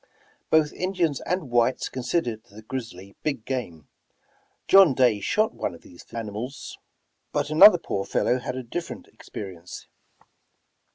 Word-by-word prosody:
Both 155 -2 +3
Indians 180 -6 -1
and 175 -7 -2
whites 120 +1 +2
considered 120 -3 -2
the 110 -1 -14
grizzly 110 -6 -7
big 140 -7 -3
game. 105 - -5 0.8
John 190 -8 +7
Day 120 -5 +3
shot 215 - 0
one 85 - -4
of - - -16
these 85 - -15
fierce 115 - -11
animals, 115 +5 -7 0.5
but 145 - -2
another 175 +5 +9
poor 100 - -3
fellow 125 +5 0
had 125 +1 -5
a 130 - -5
different 165 +9 -6
experience. 90 -4 -9
125 Hz, 135 wpm, -25 LUFS, 110-155 Hz, 0.8 s, another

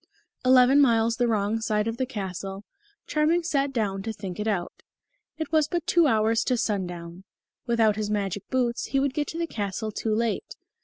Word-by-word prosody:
Eleven 255 +2 +6
miles 230 -3 +3
the 245 - +2
wrong 215 0 0
side 215 -1 0
of 225 0 -3
the 260 - -1
castle, 195 -3 -5 0.4
Charming 315 +3 +1
sat 280 -4 0
down 205 -6 -1
to 225 - -4
think 195 -3 -7
it 210 - -2
out. 190 -5 -2 0.6
It 315 -1 -4
was 310 -2 +3
but 345 -1 -2
two 340 -2 +4
hours 225 -2 +2
to 250 - +1
sundown. 180 -4 -3 0.4
Without 225 -3 +3
his 210 -1 -2
magic 205 -2 -2
boots 245 -2 0
he 275 - 0
would 275 -1 0
get 295 +1 -1
to 325 - -6
the 335 - 0
castle 215 - -4
too 215 +1 -1
late. 230 - -2
225 Hz, 190 wpm, -26 LUFS, 205-270 Hz, 0.6 s, Eleven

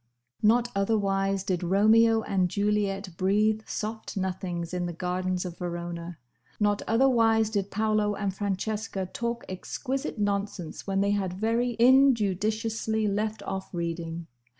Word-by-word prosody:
Not 235 +3 +4
otherwise 195 -2 +1
did 185 -3 -1
Romeo 220 +5 +4
and 185 -2 +1
Juliet 200 -1 0
breathe 210 +3 +2
soft 220 0 -5
nothings 180 -2 -3
in 180 -1 -1
the 175 - -4
gardens 180 +1 -2
of 175 -1 -7
Verona. 170 -1 -5 0.4
Not 205 -1 +2
otherwise 225 -2 +3
did 200 -2 -1
Paolo 215 0 +1
and 200 -2 -2
Francesca 200 0 -2
talk 235 +5 -4
exquisite 255 +9 -4
nonsense 200 -5 -2
when 195 0 +1
they 200 0 +2
had 195 -3 -1
very 230 +5 0
injudiciously 220 -3 +3
left 210 +2 -1
off 190 0 -5
reading. 170 -1 -3
200 Hz, 125 wpm, -27 LUFS, 185-220 Hz, 0.4 s, Not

